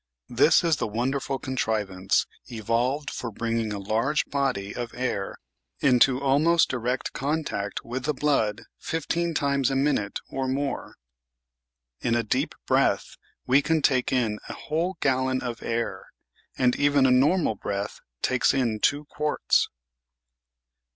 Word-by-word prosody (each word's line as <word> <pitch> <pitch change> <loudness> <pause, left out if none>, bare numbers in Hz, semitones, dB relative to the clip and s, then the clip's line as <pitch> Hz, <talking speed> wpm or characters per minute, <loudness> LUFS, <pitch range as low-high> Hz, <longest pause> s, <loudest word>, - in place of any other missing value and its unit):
This - - +4
is 165 -3 +2
the - - -1
wonderful 135 +5 -1
contrivance 105 -8 0 0.2
evolved 120 +6 -1
for 120 - -4
bringing 115 0 -2
a 105 - -3
large 110 +9 0
body 130 -8 -1
of 120 -1 -5
air 120 -6 -2 0.4
into 130 0 +4
almost 150 +5 +3
direct 125 +1 -2
contact 140 -9 -2
with 125 +2 -4
the 150 - +1
blood 130 -8 +1 0.2
fifteen 165 +1 -2
times 140 -2 +1
a 135 - -1
minute 135 -7 0
or 135 -1 -3
more. 135 +1 -3 1.0
In 115 - 0
a 120 - +1
deep 110 - -1
breath - - +1 0.3
we 135 +3 +4
can 160 0 +1
take 130 -2 +2
in 115 -5 0
a - - -4
whole 165 +4 -2
gallon 130 -1 +1
of 120 -2 -4
air, 115 0 -3 0.5
and 125 -1 +3
even 145 -1 +4
a 130 - +5
normal 145 +3 +3
breath 100 0 -4 0.2
takes 130 +1 +2
in 115 -5 0
two 145 +6 +1
quarts. 150 +1 +1
130 Hz, 135 wpm, -26 LUFS, 115-145 Hz, 1.0 s, a